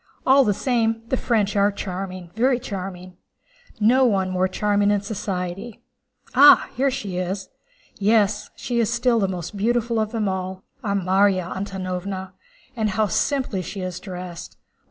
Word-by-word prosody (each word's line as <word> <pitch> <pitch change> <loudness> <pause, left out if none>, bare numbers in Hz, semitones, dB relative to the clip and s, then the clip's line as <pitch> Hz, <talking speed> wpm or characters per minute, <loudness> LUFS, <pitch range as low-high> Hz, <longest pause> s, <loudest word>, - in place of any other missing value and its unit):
All 270 +1 +6
the 210 - +2
same, 225 0 0
the - - +2
French 215 -5 0
are 200 0 +3
charming, 185 -3 -6
very 245 +3 +2
charming. 185 -5 -7 0.6
No 245 +5 +4
one 195 -6 +2
more 185 0 +1
charming 205 +1 +1
in 205 -1 +2
society. 195 +1 -5 0.5
Ah, - - +7
here 275 +2 +2
she 205 -8 -4
is! 190 +1 -3 0.5
Yes, 210 0 +2
she 240 -1 -2
is 230 -1 +1
still 235 -1 +2
the 195 - +2
most 185 +1 -5
beautiful 230 +2 0
of 215 0 -1
them 220 -3 -1
all, 190 0 -3 0.2
our 200 -2 0
Márya 190 -1 +2
Antónovna! 190 0 -4 0.4
And 220 -3 0
how 215 +2 +1
simply 240 - 0
she 190 +2 -6
is 185 -1 -4
dressed! 180 -3 -8
200 Hz, 155 wpm, -23 LUFS, 185-225 Hz, 0.6 s, Ah